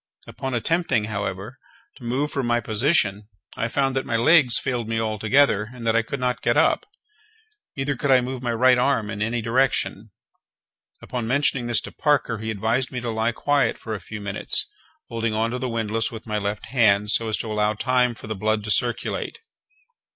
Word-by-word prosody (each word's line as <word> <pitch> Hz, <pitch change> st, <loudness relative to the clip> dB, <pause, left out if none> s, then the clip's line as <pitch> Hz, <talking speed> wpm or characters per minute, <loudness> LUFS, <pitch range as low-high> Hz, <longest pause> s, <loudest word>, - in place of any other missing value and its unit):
Upon 135 Hz, -1 st, -5 dB
attempting, 165 Hz, -2 st, +1 dB
however, 105 Hz, +2 st, -4 dB, 0.4 s
to 130 Hz, -, -15 dB
move 130 Hz, +5 st, -1 dB
from 135 Hz, -3 st, -2 dB
my 120 Hz, 0 st, +2 dB
position, 110 Hz, -3 st, +1 dB, 0.3 s
I 115 Hz, -, -1 dB
found 135 Hz, +2 st, 0 dB
that 135 Hz, -, 0 dB
my 115 Hz, -, -2 dB
legs 125 Hz, +1 st, +5 dB
failed 120 Hz, -3 st, -2 dB
me 115 Hz, 0 st, 0 dB
altogether, 110 Hz, 0 st, +2 dB
and 125 Hz, -2 st, -9 dB
that 115 Hz, 0 st, +2 dB
I 115 Hz, -, +4 dB
could 125 Hz, +4 st, -5 dB
not 125 Hz, -1 st, -1 dB
get 120 Hz, +3 st, +1 dB
up; 160 Hz, -, +3 dB, 0.9 s
neither 135 Hz, +1 st, -1 dB
could 140 Hz, +3 st, -2 dB
I 130 Hz, -1 st, +6 dB
move 125 Hz, 0 st, -4 dB
my 120 Hz, -2 st, -1 dB
right 125 Hz, +2 st, +4 dB
arm 125 Hz, -5 st, +1 dB
in 105 Hz, -1 st, -5 dB
any 115 Hz, +1 st, -1 dB
direction. 115 Hz, -3 st, 0 dB, 0.9 s
Upon 120 Hz, -3 st, -4 dB
mentioning 130 Hz, -1 st, +1 dB
this 120 Hz, -, +1 dB
to -, -, -9 dB
Parker, 140 Hz, -7 st, +1 dB
he 110 Hz, 0 st, -4 dB
advised 115 Hz, +5 st, -1 dB
me 125 Hz, -, -3 dB
to 120 Hz, -1 st, -3 dB
lie 110 Hz, +1 st, 0 dB
quiet 145 Hz, +4 st, +1 dB
for 110 Hz, -, -6 dB
a 105 Hz, -, -4 dB
few 105 Hz, -, -8 dB
minutes, 100 Hz, -1 st, 0 dB, 0.4 s
holding 115 Hz, -1 st, -2 dB
on 115 Hz, +1 st, 0 dB
to 125 Hz, -, -3 dB
the 130 Hz, 0 st, -2 dB
windlass 115 Hz, -1 st, -1 dB
with 115 Hz, -2 st, -9 dB
my 105 Hz, -2 st, -2 dB
left 100 Hz, +1 st, -3 dB
hand, 105 Hz, -4 st, +3 dB
so 115 Hz, 0 st, +1 dB
as 110 Hz, -, 0 dB
to 110 Hz, -, -4 dB
allow 105 Hz, 0 st, +1 dB
time 125 Hz, +1 st, +1 dB
for -, -, -11 dB
the 110 Hz, -, -3 dB
blood 110 Hz, +1 st, -1 dB
to 105 Hz, -, -3 dB
circulate. 120 Hz, -, -1 dB
115 Hz, 200 wpm, -23 LUFS, 110-130 Hz, 0.9 s, I